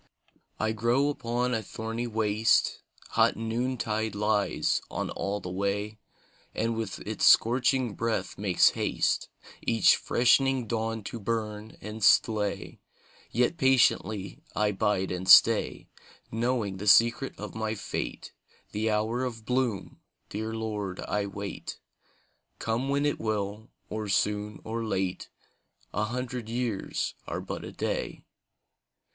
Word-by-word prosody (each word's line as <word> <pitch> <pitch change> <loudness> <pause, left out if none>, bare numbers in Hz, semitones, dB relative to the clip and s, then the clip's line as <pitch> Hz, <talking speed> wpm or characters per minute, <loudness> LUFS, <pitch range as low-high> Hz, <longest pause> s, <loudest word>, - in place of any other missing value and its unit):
I 110 - +1
grow 120 +6 +2
upon 125 -2 -1
a 115 - 0
thorny 115 +2 -4
waste; 110 -1 +2 0.3
Hot - - +3
noontide 110 -2 -2
lies 105 0 +1
on - - -3
all 100 +1 -2
the 90 - -7
way, 100 +3 -2 0.6
And 115 +1 0
with 110 -4 -3
its - - 0
scorching 125 0 +4
breath 110 -4 -2
makes 95 -3 +4
haste - - 0 0.3
Each 115 -1 +4
freshening 130 +1 +3
dawn 115 0 -2
to 115 - -6
burn 110 0 -3
and 105 +1 -6
slay, 105 -1 +2 0.5
Yet 125 +8 +1
patiently 110 -6 +2 0.2
I 105 0 +2
bide 100 -2 0
and 90 +1 -3
stay: - - +6 0.4
Knowing 115 -4 -1
the 105 +3 -6
secret 115 +5 +4
of 105 - -6
my 110 0 -2
fate, 100 - -5 0.4
The 110 +2 -1
hour 110 +4 0
of 115 -4 -5
bloom, 125 -6 -1 0.3
dear 110 +2 -4
Lord, 105 -4 -4
I 105 -1 -1
wait, 100 0 -6 0.8
Come 115 +4 -1
when 140 +1 +1
it 145 - 0
will, 105 0 -3 0.2
or 110 -1 -4
soon 105 +2 0
or 115 +1 -3
late, 95 -4 -2 0.6
A 105 - 0
hundred 125 0 -4
years 115 -4 -2
are - - -3
but - - -6
a - - -7
day. - - -3
110 Hz, 130 wpm, -28 LUFS, 105-120 Hz, 0.8 s, stay